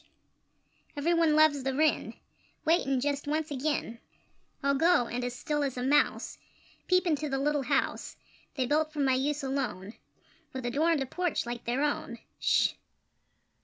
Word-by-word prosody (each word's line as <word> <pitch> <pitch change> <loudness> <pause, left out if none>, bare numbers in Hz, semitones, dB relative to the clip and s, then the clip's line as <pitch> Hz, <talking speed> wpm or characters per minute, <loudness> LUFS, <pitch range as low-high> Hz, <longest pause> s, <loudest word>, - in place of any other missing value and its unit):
Every 320 +4 +1
one 330 -2 +3
loves 310 -2 +4
the 265 0 -2
Wren! 310 +2 +1 0.5
Wait, 330 -1 +3
and 270 -1 +1
just 285 +1 -2
once 310 +1 -1
again 270 -4 -2 0.6
I'll 280 0 +3
go, 325 -2 +3
and, 245 +1 -4
as 245 0 -3
still 295 +3 -2
as 270 -3 -3
a 245 - -2
mouse, 290 +3 +1 0.5
Peep 365 0 +3
into 305 -3 0
the 270 - -1
little 290 +1 +1
house 265 - -1 0.4
They 260 -3 0
built 305 +3 +1
for 305 - -7
my 270 -2 +3
use 280 +3 -1
alone, 245 -7 -3 0.6
With 260 -2 -5
a 240 - -1
door 305 +6 +2
and 315 -5 +2
a - - -5
porch 355 +3 -2
like 240 0 -6
their 245 +4 0
own! 285 -5 -2 0.2
Sh! - - +3
285 Hz, 170 wpm, -29 LUFS, 260-310 Hz, 0.6 s, loves